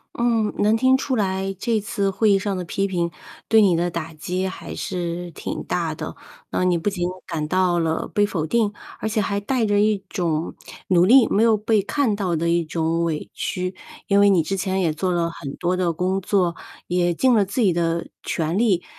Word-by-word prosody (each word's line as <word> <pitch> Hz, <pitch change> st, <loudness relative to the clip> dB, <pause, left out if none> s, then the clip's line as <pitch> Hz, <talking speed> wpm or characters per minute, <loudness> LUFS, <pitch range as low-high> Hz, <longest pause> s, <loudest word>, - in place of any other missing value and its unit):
嗯， 230 Hz, -3 st, +1 dB
能 215 Hz, +2 st, +4 dB
听 260 Hz, +2 st, +4 dB
出 265 Hz, -1 st, -1 dB
来 195 Hz, -2 st, -1 dB
这 225 Hz, +1 st, 0 dB
次 200 Hz, -3 st, -1 dB
会 210 Hz, +3 st, +2 dB
议 195 Hz, -, +5 dB
上 195 Hz, 0 st, -2 dB
的 180 Hz, -, -3 dB
批 195 Hz, +3 st, -1 dB
评， 175 Hz, -3 st, -1 dB, 0.4 s
对 220 Hz, 0 st, +5 dB
你 180 Hz, -4 st, +4 dB
的 175 Hz, +1 st, 0 dB
打 165 Hz, -1 st, -5 dB
击 180 Hz, +5 st, -3 dB
还 185 Hz, -, -7 dB
是 175 Hz, -1 st, -4 dB
挺 -, -, -5 dB
大 -, -, -2 dB
的。 -, -, -6 dB, 0.4 s
那 -, -, 0 dB
你 180 Hz, -1 st, +3 dB
不 170 Hz, +5 st, -4 dB
仅 175 Hz, -2 st, -2 dB, 0.2 s
感 155 Hz, -4 st, -3 dB
到 180 Hz, 0 st, +2 dB
了 160 Hz, -1 st, -1 dB
被 205 Hz, -, +3 dB
否 165 Hz, -6 st, -2 dB
定， 210 Hz, +3 st, +1 dB, 0.3 s
而 220 Hz, -, -2 dB
且 215 Hz, 0 st, 0 dB
还 200 Hz, 0 st, -1 dB
带 230 Hz, +3 st, 0 dB
着 205 Hz, 0 st, +2 dB
一 210 Hz, -2 st, +1 dB
种 165 Hz, -4 st, -1 dB, 0.4 s
努 180 Hz, -2 st, +5 dB
力 245 Hz, +4 st, +7 dB
没 210 Hz, -, +2 dB
有 225 Hz, -2 st, +4 dB
被 215 Hz, 0 st, +2 dB
看 215 Hz, +2 st, 0 dB
到 185 Hz, -5 st, -1 dB
的 165 Hz, +2 st, -1 dB
一 170 Hz, 0 st, +2 dB
种 165 Hz, +1 st, -1 dB
委 160 Hz, -3 st, -3 dB
屈， 185 Hz, 0 st, -3 dB, 0.3 s
因 200 Hz, -1 st, +4 dB
为 200 Hz, 0 st, +6 dB
你 175 Hz, -5 st, +4 dB
之 195 Hz, +5 st, -2 dB
前 190 Hz, 0 st, -1 dB
也 160 Hz, -3 st, +1 dB
做 185 Hz, +4 st, -1 dB
了 170 Hz, -1 st, 0 dB
很 140 Hz, -4 st, -7 dB
多 180 Hz, +1 st, 0 dB
的 180 Hz, -2 st, +1 dB
工 185 Hz, +3 st, -1 dB
作， 185 Hz, -3 st, +1 dB, 0.3 s
也 175 Hz, 0 st, +1 dB
尽 260 Hz, +5 st, +3 dB
了 210 Hz, -3 st, +4 dB
自 200 Hz, +6 st, -4 dB
己 190 Hz, -6 st, +4 dB
的 170 Hz, 0 st, -1 dB
全 160 Hz, +1 st, -2 dB
力。 200 Hz, -7 st, +2 dB
185 Hz, 230 characters per minute, -22 LUFS, 170-205 Hz, 0.4 s, 力